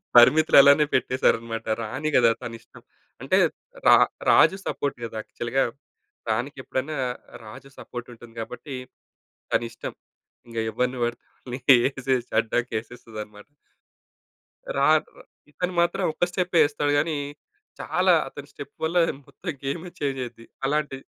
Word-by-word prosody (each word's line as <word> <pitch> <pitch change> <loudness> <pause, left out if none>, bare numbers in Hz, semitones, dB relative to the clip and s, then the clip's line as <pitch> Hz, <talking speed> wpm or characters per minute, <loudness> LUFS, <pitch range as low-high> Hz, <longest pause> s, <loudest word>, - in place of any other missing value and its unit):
పరిమితులు 150 +7 +7
అలానే 140 +2 +6
పెట్టేసారన్నమాట. 115 -3 +1 0.2
రాణి 135 +8 -3
కదా 115 -2 +5
తనిష్టం. 115 -1 -10 0.4
అంటే, - - +2 0.5
రా - - +9 0.4
రాజు 190 - +6
సపోర్ట్ 140 -3 -2
కదా 115 -1 -6
యాక్చువల్‌గా 120 +5 -1 0.7
రాణికెప్పుడైనా 130 +4 -3 0.5
రాజు 110 +5 -11
సపోర్ట్ 120 0 -8
ఉంటుంది 120 0 -14
కాబట్టి, 125 +5 -7 0.8
తనిష్టం. 115 0 -2 0.6
ఇంకా 115 -1 -2
ఎవ్వరిని 125 +3 -1
పడితే 120 0 -5
వాళ్ళని 125 0 -8 0.3
ఏసేసి 130 -2 -2
అడ్డంగా 120 +2 -1
ఏసేస్తదన్నమాట. 105 -3 -10 1.3
రా 140 - +4 0.6
ఇతను 180 +4 -3
మాత్రం 175 +3 0
ఒక్క - - -2
స్టెప్పే 180 -2 +1
ఏస్తాడు 145 -1 -1
కానీ, 155 0 0 0.6
చాలా - - +2
అతని - - -10
స్టెప్ - - -10
వల్ల 165 +3 0 0.3
మొత్తం 175 - -6
గేమే 160 +6 -3
చేంజ్ 135 -2 -1
అయిద్ది. 120 -1 -10 0.2
అలాంటి, 145 -1 0
130 Hz, 115 wpm, -25 LUFS, 115-150 Hz, 1.3 s, రా